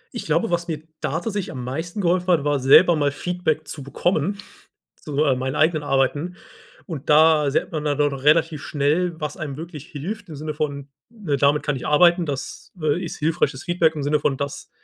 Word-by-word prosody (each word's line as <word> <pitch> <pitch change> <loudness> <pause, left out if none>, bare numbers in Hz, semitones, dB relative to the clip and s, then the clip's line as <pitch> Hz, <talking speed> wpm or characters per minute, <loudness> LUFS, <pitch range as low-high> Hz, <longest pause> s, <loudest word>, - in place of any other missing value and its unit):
Ich - - -5
glaube, 230 - +1
was 170 0 -1
mir 155 -2 -4 0.2
da 135 - -2
tatsächlich 205 -3 -3
am 125 -2 -6
meisten 165 - -4
geholfen 180 0 +1
hat, 170 -6 +3
war 145 -1 +1
selber 165 +6 +6
mal 145 -2 +1
Feedback 160 0 -2
zu 145 - -5
bekommen, 175 +6 -1 0.6
zu, 150 0 -2
äh 135 -3 +3
meinen 130 +2 -3
eigenen 155 0 +2
Arbeiten. 145 +5 0 0.5
Und 155 -6 -7
da 155 -1 +5
sieht 140 - -1
man 155 -2 -3
dann 145 0 0
relativ 150 +2 +2
schnell, 160 +4 0
was 150 +3 -4
einem 145 -5 -5
wirklich 155 -2 -8
hilft 200 +7 -6
im 155 - -7
Sinne 155 +1 -5
von, 140 -2 -3 0.2
ne, 200 -12 -3
damit 145 +2 +3
kann 145 - -1
ich - - -5
arbeiten. 170 +2 +4
Das, 140 -1 -6
äh, 155 +3 0
ist 165 - -6
hilfreiches 155 -4 0
Feedback 170 -2 +1
im 145 - -3
Sinne 150 +1 +1
von 140 -1 0
das 140 +1 -5
155 Hz, 200 wpm, -22 LUFS, 145-170 Hz, 0.6 s, selber